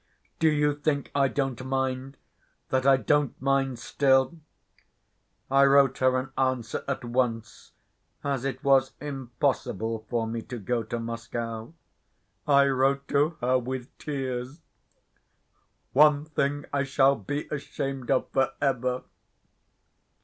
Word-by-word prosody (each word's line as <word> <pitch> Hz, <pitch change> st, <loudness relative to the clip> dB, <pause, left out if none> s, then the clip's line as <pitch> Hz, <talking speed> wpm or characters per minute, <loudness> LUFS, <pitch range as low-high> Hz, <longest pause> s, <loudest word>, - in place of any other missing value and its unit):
Do 160 Hz, -, +4 dB
you 150 Hz, -1 st, +2 dB
think 145 Hz, -1 st, -2 dB
I 140 Hz, -1 st, +3 dB
don't 135 Hz, -2 st, -2 dB
mind—that 130 Hz, 0 st, -4 dB
I 135 Hz, -1 st, +7 dB
don't 145 Hz, +1 st, +1 dB
mind 135 Hz, -1 st, +1 dB
still? 135 Hz, +5 st, +2 dB, 1.1 s
I 135 Hz, 0 st, +6 dB
wrote 140 Hz, -1 st, +4 dB
her 130 Hz, 0 st, +3 dB
an 130 Hz, +1 st, -4 dB
answer 130 Hz, -3 st, -1 dB
at 135 Hz, -3 st, -3 dB
once, 120 Hz, -2 st, -2 dB, 0.5 s
as 140 Hz, -3 st, -1 dB
it 135 Hz, +1 st, -4 dB
was 135 Hz, -1 st, +4 dB
impossible 120 Hz, -5 st, -2 dB
for 115 Hz, -2 st, 0 dB
me 115 Hz, +1 st, -3 dB
to 125 Hz, -, -7 dB
go 115 Hz, +3 st, -1 dB
to 110 Hz, +1 st, -4 dB
Moscow. 115 Hz, +2 st, -5 dB, 0.7 s
I 140 Hz, -1 st, +6 dB
wrote 135 Hz, +1 st, +1 dB
to 150 Hz, +3 st, +2 dB
her 130 Hz, +1 st, +3 dB
with 125 Hz, 0 st, -6 dB
tears. 135 Hz, +1 st, -4 dB, 1.3 s
One 150 Hz, +1 st, +5 dB
thing 145 Hz, -2 st, -1 dB
I 140 Hz, -1 st, +2 dB
shall 135 Hz, 0 st, +3 dB
be 145 Hz, +8 st, -4 dB
ashamed 135 Hz, -3 st, -4 dB
of 135 Hz, -2 st, +2 dB
for 135 Hz, 0 st, +1 dB
ever. 130 Hz, -2 st, 0 dB
135 Hz, 125 wpm, -27 LUFS, 125-140 Hz, 1.3 s, I